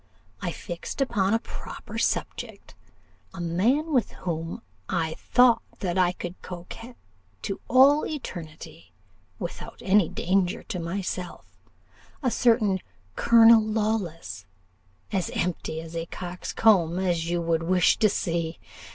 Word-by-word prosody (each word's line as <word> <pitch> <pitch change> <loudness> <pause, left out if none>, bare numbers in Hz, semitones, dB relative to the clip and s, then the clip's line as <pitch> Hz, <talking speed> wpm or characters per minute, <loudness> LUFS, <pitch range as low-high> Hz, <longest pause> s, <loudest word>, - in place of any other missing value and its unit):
I - - -2
fixed - - -7
upon 225 -6 +2
a 230 - -2
proper - - -7
subject - - -3 0.6
a - - -8
man 230 - +1
with 250 -4 +1
whom 165 +5 -3 0.3
I 165 -3 0
thought 245 +3 +4 0.2
that 180 -4 -2
I 180 -2 +3
could 175 0 -8
coquette 185 +7 -9 0.5
to - - -4
all 275 +3 +6
eternity, 160 - -8 0.4
without 170 - -7
any 195 -3 +4
danger 185 0 0
to 180 - -5
myself 180 +1 -4 0.8
a 250 - +2
certain 225 -6 +3 0.4
Colonel 230 -1 +7
Lawless, 210 - -2 0.6
as 190 -4 -1
empty 170 -2 -2
a 165 0 -5
coxcomb 180 0 +1
as 175 -3 0
you 175 0 0
would 165 -1 0
wish 180 +1 +3
to 215 - +4
see. 170 -4 -2
185 Hz, 120 wpm, -26 LUFS, 170-225 Hz, 0.8 s, Colonel